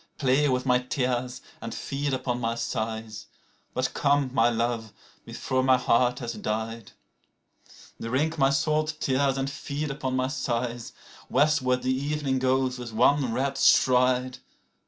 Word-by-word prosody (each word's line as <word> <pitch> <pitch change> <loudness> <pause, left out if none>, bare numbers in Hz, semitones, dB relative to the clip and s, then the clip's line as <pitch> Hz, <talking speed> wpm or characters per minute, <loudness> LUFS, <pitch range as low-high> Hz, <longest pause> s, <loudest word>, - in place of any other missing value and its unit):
Play 140 +2 +2
with 125 0 0
my 125 -1 +4
tears 125 -1 -2 0.2
and 115 0 -6
feed 140 +1 -3
upon 125 -2 -2
my 115 0 -1
sighs, 110 -1 -4 0.5
But 130 0 -1
come, 140 -2 +1
my 115 -1 +4
love, 115 -2 -2 0.3
before 130 0 -2
my 130 0 +4
heart 125 0 +2
has 120 -2 -4
died. 110 0 -4 0.7
PLAINTE - - -20
ETERNELLE 115 - -5
Drink 155 +5 0
my 135 0 +5
salt 155 +2 0
tears 135 0 +1
and 135 0 -1
feed 145 +1 -4
upon 135 -2 -3
my 130 0 +1
sighs. 120 -3 -3 0.4
(Westward 135 -4 +2
the 130 - +1
evening 140 -1 -1
goes 130 0 +1
with 120 -2 -7
one 130 +2 +3
red 135 +3 -1
stride.) 125 -1 +3
130 Hz, 150 wpm, -26 LUFS, 120-140 Hz, 0.7 s, my